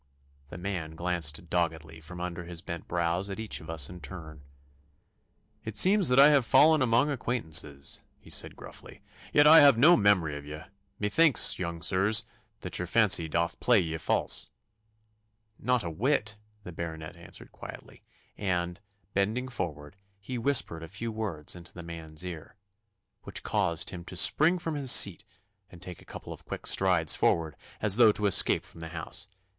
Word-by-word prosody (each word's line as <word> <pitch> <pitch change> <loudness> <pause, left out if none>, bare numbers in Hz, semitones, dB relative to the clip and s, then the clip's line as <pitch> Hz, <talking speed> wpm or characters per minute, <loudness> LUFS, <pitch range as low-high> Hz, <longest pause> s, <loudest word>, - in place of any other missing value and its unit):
The - - -9
man 90 -4 -5
glanced 85 -2 -2
doggedly 80 -2 -3
from 90 +3 -10
under 90 -1 -6
his 85 -1 -7
bent 85 -1 -7
brows 85 +3 -2
at 95 - -6
each 110 -1 -5
of 80 - -13
us 80 -4 +1
in 90 0 -11
turn. 80 -1 -10 1.2
'It 110 -1 -6
seems 195 - +4
that 125 +1 +3
I 140 +2 +8
have 140 -3 +3
fallen 155 +6 +4
among 125 +4 +2
acquaintances,' 80 - -2 0.2
he - - -13
said - - +1
gruffly; - - -13 0.3
'yet 145 - +4
I 160 +2 +9
have 140 -5 +6
no 160 +8 +6
memory 95 - +2
of 75 - -8
ye. 75 +1 -8 0.4
Methinks, 135 +9 +3
young 85 -2 -5
sirs, 100 +4 +2 0.4
that - - -4
your 90 - -4
fancy 95 -6 +3
doth 85 +2 -2
play 120 -3 +3
ye 80 -3 -3
false.' - - 0 1.1
'Not 125 -1 0
a 85 - -4
whit,' 110 - -1 0.3
the 90 - -9
Baronet 80 -1 -7
answered 85 0 -12
quietly, - - -12 0.3
and, 90 -2 -3 0.3
bending 110 +6 -1
forward, 85 -7 -6 0.2
he 120 +5 -6
whispered 115 -10 0
a 80 - -8
few 110 +7 -6
words 100 -10 -4
into 85 -1 -11
the 90 - -9
man's 80 0 -8
ear, 85 0 -9 0.7
which - - -7
caused 85 0 -1
him 90 -2 -8
to 90 - -10
spring 160 - +4
from 165 -2 -5
his 140 -4 +3
seat 100 +1 +5 0.5
and 90 - -14
take 90 -1 -10
a - - -18
couple - - -9
of - - -14
quick - - -8
strides 90 -5 +2
forward, 80 -2 0 0.3
as 105 -1 +4
though 115 -3 +6
to 105 0 -3
escape 100 - +3
from - - -15
the 80 - -7
house. 80 -2 -4
90 Hz, 170 wpm, -28 LUFS, 80-110 Hz, 1.2 s, I